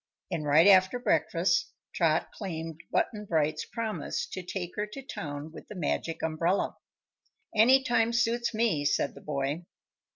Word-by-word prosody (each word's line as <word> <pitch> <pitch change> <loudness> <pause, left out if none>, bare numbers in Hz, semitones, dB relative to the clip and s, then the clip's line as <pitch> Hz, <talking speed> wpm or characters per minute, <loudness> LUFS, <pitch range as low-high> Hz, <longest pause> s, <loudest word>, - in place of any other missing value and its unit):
And 155 -4 -2
right 155 +4 +6
after 190 +3 +6
breakfast 170 -5 +1 0.2
Trot 160 -2 +1
claimed 165 -5 -6
Button 210 -1 0
Bright's 155 -4 0
promise 225 -2 -3
to 185 - -5
take 180 -1 -5
her 210 0 -2
to 270 +6 -9
town 150 - -6
with - - -11
the 210 - -9
Magic 165 -1 -2
Umbrella. 165 +4 0 0.8
"Any 255 +5 +6
time 235 -2 +2
suits 235 0 +1
me," 220 -10 +1
said 145 - +1
the - - -13
boy. 140 +2 -2
175 Hz, 150 wpm, -29 LUFS, 155-220 Hz, 0.8 s, right